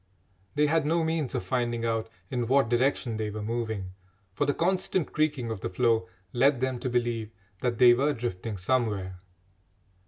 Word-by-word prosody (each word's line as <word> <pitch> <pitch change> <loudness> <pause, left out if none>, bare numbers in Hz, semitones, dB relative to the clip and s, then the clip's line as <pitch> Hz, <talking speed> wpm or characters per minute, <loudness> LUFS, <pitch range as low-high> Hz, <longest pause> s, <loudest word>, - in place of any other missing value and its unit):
They 150 - +4
had 160 +1 +2
no 165 +3 +1
means 160 -4 -1
of - - -1
finding 120 -2 -1
out 115 -1 -1 0.2
in 120 -2 -1
what 135 -1 +3
direction 120 -2 +1
they 110 -1 -2
were 105 0 -5
moving, 110 -4 -3 0.4
for - - 0
the 145 - +3
constant 185 -1 0
creaking 145 -6 0
of 105 -4 -5
the - - -2
floe 115 0 +2 0.3
led 135 +2 +3
them 130 -1 -1
to 130 - -2
believe 120 -3 -1 0.3
that 120 -2 -1
they 120 0 +8
were 140 +5 +2
drifting 115 -4 -4
somewhere. 100 -4 -1
120 Hz, 175 wpm, -28 LUFS, 110-140 Hz, 0.4 s, they